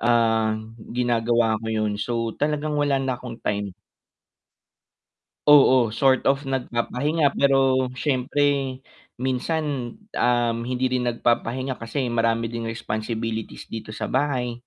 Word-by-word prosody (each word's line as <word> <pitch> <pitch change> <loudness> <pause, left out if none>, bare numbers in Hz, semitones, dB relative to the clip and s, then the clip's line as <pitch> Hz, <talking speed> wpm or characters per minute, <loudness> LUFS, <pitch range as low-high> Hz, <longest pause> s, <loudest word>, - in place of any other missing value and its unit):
ah, 115 -2 +2 0.4
ginagawa 115 -2 +2
ko 110 - -5
yun. 110 -2 -1
So, 115 0 -2
talagang 150 0 0
wala 145 -1 +2
na 135 -2 -2
akong 120 -2 -7
time. 100 -2 -2 1.7
Oo, 130 -5 +6
sort 130 +4 +3
of 140 +1 -1
nagpapahinga, 135 +4 0
pero 135 -2 +3
siyempre, 140 -1 0 0.4
minsan, 130 0 -2 0.2
um, 120 -1 +2
hindi 125 +1 -1
rin 125 -1 0
nagpapahinga 120 +2 0
kasi 125 +3 -2
marami 115 -1 +1
din 115 0 -5
responsibilities 115 0 -4
dito 110 -1 -7
sa 110 - -4
bahay. 130 -3 0
125 Hz, 115 wpm, -24 LUFS, 115-135 Hz, 1.7 s, Oo